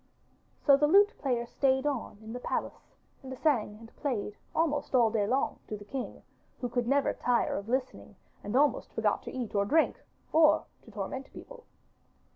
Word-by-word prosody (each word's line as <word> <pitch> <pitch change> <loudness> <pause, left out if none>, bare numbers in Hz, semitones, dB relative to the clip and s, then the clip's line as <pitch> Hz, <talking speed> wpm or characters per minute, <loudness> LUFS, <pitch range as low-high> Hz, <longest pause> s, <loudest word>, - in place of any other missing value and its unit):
So 280 -2 +7
the 295 +1 +3
lute 405 +6 +6
player 245 -4 0
stayed 265 +2 +1
on 275 -7 -2
in 220 +1 -8
the 250 - -5
palace - - -4 0.3
and 260 -1 -8
sang 235 -9 +1
and 230 0 -15
played 225 -7 -2 0.2
almost 295 -4 0
all 235 -3 +5
day 210 -3 +1
long 260 +5 0
to 215 - -4
the 205 - -12
king, 260 +5 -6 0.4
who 245 - -3
could 240 0 -1
never 280 +1 +2
tire 245 -1 +1
of 200 +2 -5
listening 255 +1 -3 0.3
and 205 +4 -4
almost 285 +2 +2
forgot - - +1
to - - -6
eat 240 -4 -5
or 200 -1 +2
drink 305 +10 +2 0.3
or 310 -1 +5 0.2
to - - -14
torment 215 +6 -5
people. - - -12
260 Hz, 180 wpm, -30 LUFS, 225-285 Hz, 0.4 s, So